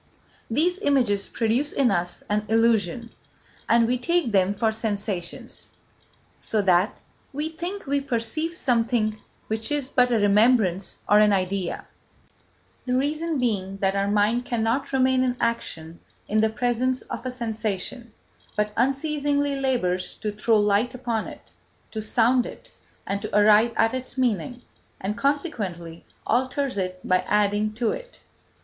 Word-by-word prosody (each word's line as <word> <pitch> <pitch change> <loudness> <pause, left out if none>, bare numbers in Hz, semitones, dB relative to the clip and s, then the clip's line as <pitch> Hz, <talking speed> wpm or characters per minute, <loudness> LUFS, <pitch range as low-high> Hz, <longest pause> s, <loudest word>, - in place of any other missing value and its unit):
These 340 +10 +1
images 235 -8 +1
produce 235 +6 0
in 260 -5 +2
us 175 -2 -2
an 210 0 -1
illusion, 225 -1 +1 0.6
and 230 0 +5
we 250 +2 0
take 335 -1 +1
them 190 -1 +3
for 220 +2 +1
sensations, 205 -5 -4 0.7
so 220 - -1
that 185 +2 +3 0.3
we 300 +3 -3
think 345 +5 -6
we 280 0 0
perceive 275 +6 -2
something 230 -6 0 0.2
which 220 +5 -2
is 290 -3 -1
but 250 -2 +3
a 235 - +3
remembrance 205 -2 +3
or 210 - +6
an 210 -1 +5
idea; 190 -1 -1 1.0
the 250 - +1
reason 305 +4 -1
being 195 -6 -1
that 195 0 0
our 200 0 +1
mind 210 +4 +2
cannot 240 +4 -1
remain 260 -1 +3
in 250 -1 0
action 170 -8 -3 0.3
in 215 - +1
the 220 0 +3
presence 245 +3 0
of - - -7
a 255 - -3
sensation, 225 0 -4 0.5
but 210 0 0
unceasingly 285 +2 0
labours 240 -10 -1
to 210 - -3
throw 215 +2 +2
light 210 +4 +2
upon 235 -3 -2
it, - - -12 0.4
to 220 - -4
sound 240 +3 +2
it, - - -11 0.3
and 200 +1 -2
to 205 - -1
arrive 210 +3 +5
at 225 +1 +2
its 255 +1 -4
meaning, 245 -1 -1 0.4
and 200 +2 -3
consequently 210 - -2 0.2
alters 260 +3 0
it 185 -2 -3
by 185 0 +4
adding 210 +1 +2
to 225 +1 -1
it. - - -8
230 Hz, 145 wpm, -24 LUFS, 205-260 Hz, 1.0 s, or